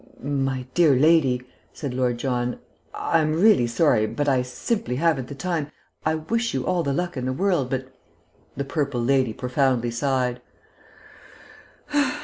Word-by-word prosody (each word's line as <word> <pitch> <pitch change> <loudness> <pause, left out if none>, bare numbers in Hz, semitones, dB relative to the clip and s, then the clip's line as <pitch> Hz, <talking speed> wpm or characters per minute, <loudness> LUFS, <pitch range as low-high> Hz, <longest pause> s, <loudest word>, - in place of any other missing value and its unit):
"My 135 -2 -1
dear 160 -6 +5
lady," 135 -3 +3 0.3
said 140 -5 -5
Lord 125 -1 0
John, 125 -1 -1 0.3
"I'm 155 -1 0
really 205 - +5
sorry, 120 -3 +2
but 145 +6 -2
I 130 -3 +3
simply 125 - -2
haven't 140 -3 +1
the 140 - -8
time, 160 -1 -2 0.3
I 155 0 +1
wish 230 +8 -1
you 130 - -1
all 180 -1 +1
the 140 -4 -1
luck 175 +2 -2
in 125 - -3
the 130 - 0
world, 175 -4 +1
but 130 0 -2 0.4
" 80 +8 -34
The 140 - -2
purple 140 -4 -1
lady 130 -1 +2
profoundly 125 -1 0
sighed. 125 0 -1
135 Hz, 150 wpm, -24 LUFS, 125-155 Hz, 0.4 s, dear